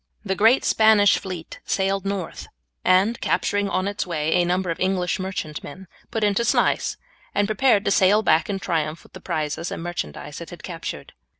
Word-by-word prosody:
The 190 Hz, -, 0 dB
great 225 Hz, +7 st, +4 dB
Spanish 220 Hz, -2 st, +5 dB
fleet 180 Hz, -4 st, -7 dB
sailed 195 Hz, 0 st, 0 dB
north, 195 Hz, -3 st, -4 dB, 0.4 s
and 195 Hz, +6 st, +3 dB
capturing 205 Hz, 0 st, 0 dB
on 185 Hz, 0 st, 0 dB
its 200 Hz, -1 st, -3 dB
way 155 Hz, -2 st, -1 dB
a 175 Hz, -, +3 dB
number 180 Hz, 0 st, 0 dB
of 165 Hz, -, -5 dB
English 185 Hz, -1 st, 0 dB
merchantmen, 185 Hz, -1 st, -6 dB, 0.2 s
put 225 Hz, -2 st, -2 dB
into 205 Hz, +2 st, +2 dB
Sluys, -, -, +1 dB, 0.4 s
and 205 Hz, 0 st, +2 dB
prepared 215 Hz, -1 st, +3 dB
to -, -, +2 dB
sail 200 Hz, +3 st, +4 dB
back 160 Hz, -1 st, +3 dB
in 200 Hz, -, -1 dB
triumph 160 Hz, -4 st, -2 dB
with -, -, -21 dB
the 185 Hz, -, -10 dB
prizes 160 Hz, -1 st, -3 dB
and -, -, -5 dB
merchandise 170 Hz, -, -5 dB
it -, -, -8 dB
had -, -, -11 dB
captured. -, -, -7 dB
190 Hz, 180 wpm, -23 LUFS, 175-205 Hz, 0.4 s, Spanish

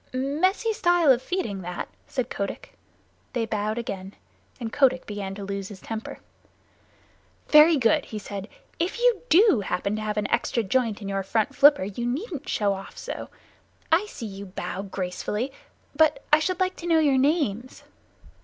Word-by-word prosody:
"Messy 350 Hz, -, +1 dB
style 350 Hz, -8 st, +4 dB
of 250 Hz, -1 st, +3 dB
feeding, 260 Hz, -, -3 dB
that," 180 Hz, 0 st, -5 dB, 0.2 s
said 255 Hz, -3 st, -3 dB
Kotick. 200 Hz, -, -5 dB, 0.6 s
They 235 Hz, -3 st, 0 dB
bowed 215 Hz, 0 st, -2 dB
again, 195 Hz, -4 st, -5 dB, 0.4 s
and 230 Hz, -2 st, -5 dB
Kotick 260 Hz, -2 st, +3 dB
began 200 Hz, -2 st, -5 dB
to 200 Hz, -, -7 dB
lose 195 Hz, -1 st, -4 dB
his 200 Hz, -2 st, -10 dB
temper. 225 Hz, +2 st, -6 dB, 1.3 s
"Very 305 Hz, +1 st, +8 dB
good," 230 Hz, -5 st, +3 dB
he 215 Hz, -, -7 dB
said. 200 Hz, -1 st, -6 dB, 0.3 s
"If 345 Hz, +6 st, -1 dB
you 480 Hz, -3 st, +3 dB
do 375 Hz, -, +6 dB
happen 195 Hz, +3 st, -1 dB
to -, -, -4 dB
have 215 Hz, 0 st, -3 dB
an 210 Hz, -, 0 dB
extra 235 Hz, -, +1 dB
joint 220 Hz, 0 st, 0 dB
in -, -, -5 dB
your 195 Hz, 0 st, -1 dB
front 210 Hz, +3 st, 0 dB
flipper 285 Hz, -6 st, +6 dB
you 205 Hz, +5 st, -3 dB
needn't 300 Hz, -, -4 dB
show 205 Hz, -2 st, +1 dB
off 195 Hz, 0 st, -9 dB
so. -, -, -6 dB, 0.6 s
I 355 Hz, +6 st, +4 dB
see 240 Hz, -, -8 dB
you 200 Hz, -1 st, -7 dB
bow 185 Hz, 0 st, -5 dB
gracefully, 200 Hz, +5 st, -3 dB, 0.4 s
but 305 Hz, -2 st, +3 dB
I 300 Hz, -, +8 dB
should 365 Hz, +3 st, -1 dB
like 370 Hz, 0 st, +1 dB
to 345 Hz, -, -6 dB
know 330 Hz, -1 st, +4 dB
your 285 Hz, -4 st, +4 dB
names." 260 Hz, -, 0 dB
235 Hz, 170 wpm, -25 LUFS, 200-310 Hz, 1.3 s, Very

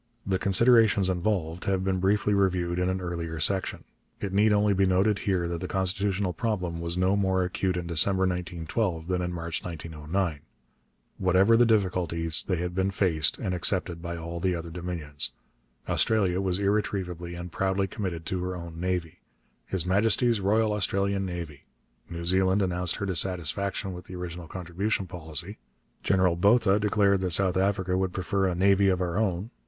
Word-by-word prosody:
The 95 Hz, -1 st, 0 dB
considerations 105 Hz, -1 st, +4 dB
involved 90 Hz, -3 st, -2 dB
have 95 Hz, -1 st, 0 dB
been 95 Hz, -1 st, 0 dB
briefly 105 Hz, +2 st, +1 dB
reviewed 90 Hz, -3 st, +1 dB
in 90 Hz, 0 st, +1 dB
an 95 Hz, 0 st, -1 dB
earlier 85 Hz, -2 st, -4 dB
section. 95 Hz, +4 st, 0 dB, 0.4 s
It 95 Hz, -2 st, -4 dB
need 105 Hz, +2 st, +4 dB
only 105 Hz, 0 st, +3 dB
be 95 Hz, 0 st, +2 dB
noted 95 Hz, +3 st, +2 dB
here 90 Hz, -3 st, +1 dB
that 85 Hz, 0 st, -4 dB
the 90 Hz, -, -3 dB
constitutional 95 Hz, 0 st, 0 dB
problem 90 Hz, -8 st, -2 dB
was 85 Hz, +1 st, -3 dB
no 95 Hz, +2 st, +2 dB
more 95 Hz, -2 st, +1 dB
acute 90 Hz, 0 st, -1 dB
in 90 Hz, -, -4 dB
December 85 Hz, +3 st, +3 dB
1912 90 Hz, 0 st, -2 dB
than 90 Hz, -1 st, -1 dB
in 90 Hz, 0 st, -2 dB
March 85 Hz, -1 st, -4 dB
1909. 80 Hz, 0 st, -3 dB, 0.8 s
Whatever 95 Hz, +4 st, +4 dB
the 120 Hz, 0 st, +5 dB
difficulties, 90 Hz, -6 st, +2 dB
they 95 Hz, -, +1 dB
had 90 Hz, +1 st, -3 dB
been 95 Hz, +1 st, 0 dB
faced 90 Hz, -6 st, +1 dB
and 95 Hz, -, -3 dB
accepted 90 Hz, -1 st, 0 dB
by 85 Hz, 0 st, -5 dB
all 85 Hz, +1 st, -6 dB
the 90 Hz, +1 st, 0 dB
other 85 Hz, 0 st, -6 dB
Dominions. 80 Hz, -7 st, -1 dB, 0.5 s
Australia 95 Hz, -5 st, +2 dB
was 95 Hz, -2 st, 0 dB
irretrievably 95 Hz, -4 st, -2 dB
and 85 Hz, 0 st, -7 dB
proudly 95 Hz, +2 st, 0 dB
committed 90 Hz, -5 st, -5 dB
to 90 Hz, -1 st, -3 dB
her 90 Hz, 0 st, -3 dB
own 85 Hz, -2 st, -8 dB
navy 90 Hz, -3 st, -3 dB, 0.5 s
'His 95 Hz, -3 st, -2 dB
Majesty's 110 Hz, +4 st, +2 dB
Royal 105 Hz, +2 st, +2 dB
Australian 100 Hz, -1 st, 0 dB
Navy'; 85 Hz, -5 st, -7 dB, 0.4 s
New 85 Hz, 0 st, -6 dB
Zealand 95 Hz, +2 st, +2 dB
announced 90 Hz, -1 st, 0 dB
her 100 Hz, -, -4 dB
dissatisfaction 95 Hz, +1 st, -2 dB
with 90 Hz, 0 st, -9 dB
the 95 Hz, -, -9 dB
original 90 Hz, -1 st, -7 dB
contribution 95 Hz, +4 st, -3 dB
policy; 85 Hz, +2 st, -6 dB, 0.4 s
General 95 Hz, -2 st, +2 dB
Botha 100 Hz, +2 st, +3 dB
declared 100 Hz, -1 st, +2 dB
that 90 Hz, -2 st, +1 dB
South 95 Hz, +1 st, +4 dB
Africa 95 Hz, -1 st, 0 dB
would 95 Hz, -1 st, -1 dB
prefer 95 Hz, +1 st, 0 dB
'a 90 Hz, -, -1 dB
navy 100 Hz, +2 st, +3 dB
of 90 Hz, -1 st, +1 dB
our 90 Hz, +1 st, -1 dB
own.' 100 Hz, +1 st, -1 dB
95 Hz, 170 wpm, -27 LUFS, 85-100 Hz, 0.8 s, the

